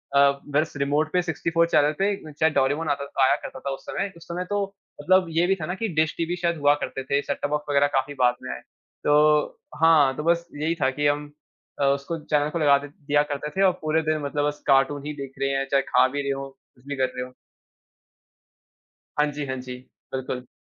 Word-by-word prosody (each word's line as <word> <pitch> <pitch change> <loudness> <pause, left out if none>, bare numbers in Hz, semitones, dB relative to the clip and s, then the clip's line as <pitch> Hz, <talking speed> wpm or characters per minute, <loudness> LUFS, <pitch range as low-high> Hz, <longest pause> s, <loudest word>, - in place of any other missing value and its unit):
अ, 140 0 +5 0.2
बस 155 +1 +1
रीमोट 145 +3 0
पे 180 - +3
64 165 0 0
चैनल 150 -2 +3
पे 200 +1 +2 0.2
चाहे 155 +2 +2
डोरेमोन 145 +3 +1
आता 140 0 -1
था 135 -1 0
आया 130 - +4
करता 130 - -7
था 140 - -4
उस - - -10
समय। 195 0 -3
उस 170 - -15
समय 180 +1 -4
तो 205 0 0 0.4
मतलब 185 +4 +4
ये 165 +2 +2
भी 195 - +3
था - - -2
ना 180 - -3
कि 225 +3 -2
डिश 155 - -1
टीवी 170 +1 -1
शायद 170 -1 -1
हुआ 145 -1 +4
करते 135 - -4
थे, 140 +2 0
सेट-टॉप 145 0 -3
बॉक्स 150 0 -1
वग़ैरह 145 0 +4
काफ़ी 135 +2 -1
बाद 125 -1 +4
में 65 - -5
आए। 65 - -8 0.4
तो 150 0 +3 0.2
हाँ, 150 -5 +5
तो 150 - -3
बस 170 +1 +1
यही 160 +2 0
था 130 - +4
कि 145 +2 0
हम 145 0 -1 0.5
अ, - - +4
उसको 140 +4 0
चैनल 150 -1 0
को 170 - -3
लगा 140 -2 +5
दे - - -6
दिया 145 0 0
करते 145 +1 -3
थे - - +2
और 190 - +6
पूरे 155 +1 +1
दिन 155 0 +1
मतलब 145 0 -1
बस 150 0 -5
कार्टून 140 +1 +3
ही 150 - -3
देख 135 -1 -7
रहे 135 - +1
हैं, 135 0 0
चाहे 140 -1 +3
खा 125 +1 +5
भी 145 +2 -3
रहे 140 0 -1
हों 135 - -7
कुछ 130 -1 -27
भी 145 - -3
कर 130 - +3
रहे 125 - -3
हों। 125 - -13 1.9
हाँ 150 - +4
जी, 145 0 -4
हाँ 130 - -2
जी, 125 0 -7 0.4
बिल्कुल। 130 -1 -4
145 Hz, 235 wpm, -24 LUFS, 140-160 Hz, 1.9 s, और